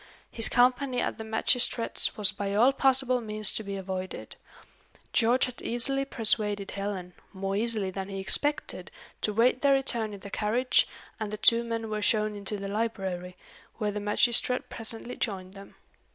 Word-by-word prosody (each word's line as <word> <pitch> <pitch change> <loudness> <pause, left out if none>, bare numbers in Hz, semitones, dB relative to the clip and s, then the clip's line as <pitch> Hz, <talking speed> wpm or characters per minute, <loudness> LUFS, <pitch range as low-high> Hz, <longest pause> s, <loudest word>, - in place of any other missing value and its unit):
His 225 - +2
company 250 +1 +2
at - - -2
the - - -4
magistrate's 230 +2 +1
was 210 -1 +2
by 200 -1 -4
all 245 +6 +5
possible 265 -2 +2
means 215 -2 -1
to 220 - +1
be 200 -1 -5
avoided. 185 -1 -6 0.8
George 240 +2 +3
had 250 -1 -7
easily 270 +3 +1
persuaded 210 -5 +2
Helen, 195 -3 -5 0.2
more 195 0 -3
easily 215 -3 +3
than 190 +1 -6
he 195 -1 -5
expected, 290 +10 0 0.3
to 210 - 0
wait 240 +4 +2
their 280 -1 +4
return 235 -5 +1
in 195 - -13
the 200 - -10
carriage, 235 +5 +2 0.3
and 215 -2 -3
the 215 - -5
two 230 +2 +4
men 230 -1 -4
were 215 -1 -3
shown 215 0 +1
into 205 +1 -3
the 200 0 -6
library, 190 -4 -3 0.4
where 210 -2 -1
the 210 - -4
magistrate 240 +4 +1
presently 225 +1 -5
joined 190 -4 -4
them. 195 0 -13
215 Hz, 165 wpm, -28 LUFS, 200-240 Hz, 0.8 s, all